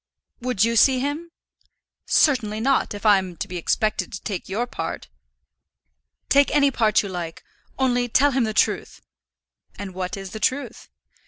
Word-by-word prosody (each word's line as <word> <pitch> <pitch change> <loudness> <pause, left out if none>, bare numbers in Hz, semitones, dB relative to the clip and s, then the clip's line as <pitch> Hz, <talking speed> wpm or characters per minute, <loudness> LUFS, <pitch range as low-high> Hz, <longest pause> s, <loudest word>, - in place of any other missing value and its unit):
"Would 245 -5 0
you 230 +1 +1
see 260 +3 +5
him?" 290 +5 -3 0.8
"Certainly 225 -8 +2
not, 260 -2 +1
if 205 - -9
I 205 -2 +6
am 185 -2 -7
to - - -4
be 180 - -6
expected 215 +5 -1
to 190 - -7
take 195 -3 -5
your 220 +5 -1
part." 245 - -6 1.2
"Take 280 0 +4
any 280 -1 +4
part 220 -4 +2
you - - -5
like, 175 -3 -6 0.3
only 245 -2 +1
tell 285 +5 +4
him 260 -2 +1
the 220 - -2
truth." 215 - 0 0.7
"And 200 -2 -7
what 185 +1 -4
is 195 -1 -8
the 220 - -6
truth?" 280 +5 -2
220 Hz, 165 wpm, -23 LUFS, 195-265 Hz, 1.2 s, I